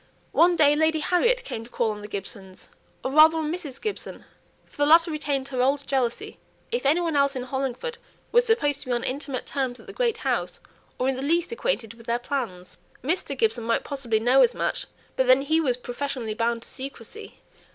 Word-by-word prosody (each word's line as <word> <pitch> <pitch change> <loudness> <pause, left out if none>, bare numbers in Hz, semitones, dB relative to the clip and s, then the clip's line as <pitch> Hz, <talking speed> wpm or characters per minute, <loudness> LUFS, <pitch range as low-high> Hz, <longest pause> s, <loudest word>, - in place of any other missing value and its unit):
One 345 +1 +5
day 295 -2 +5
Lady 315 +1 +2
Harriet 470 +11 +2
came 225 - -5
to 230 - -14
call 235 -3 0
on 210 -1 -7
the 210 - -7
Gibsons, 195 -2 -8 0.3
or 260 - -2
rather 310 +3 +7
on 310 0 -1
Mrs. 295 -7 -6
Gibson, 425 -2 -5 0.4
for - - -23
the 290 - +3
latter 330 +2 +6
retained 285 -3 -2
her 255 -2 -1
old 275 +2 +1
jealousy 270 - -2 0.3
if 480 - 0
any 310 +5 +4
one 335 -3 -1
else 280 0 +3
in 255 - -3
Hollingford 270 - -3 0.3
was 485 +1 +5
supposed 290 - +1
to 285 - -8
be 250 - 0
on 240 - -1
intimate 275 -1 -3
terms 260 -3 -2
at - - -15
the - - -10
great 475 -3 0
house, - - -2 0.4
or 255 - 0
in 265 -1 0
the - - -4
least 335 +7 +1
acquainted 465 - -2
with 230 0 -16
their 235 0 +1
plans. 235 -10 -5 0.2
Mr. 325 +8 -1
Gibson 430 - +1
might 230 0 +1
possibly 245 -6 -1
know 250 +4 +4
as 475 - +4
much, - - -2 0.3
but 260 - +1
then 255 +2 +6
he 315 +3 +2
was 255 -6 +1
professionally 250 -2 -4
bound 230 +1 -1
to - - -9
secrecy. 275 - -8
275 Hz, 210 wpm, -25 LUFS, 245-320 Hz, 0.4 s, rather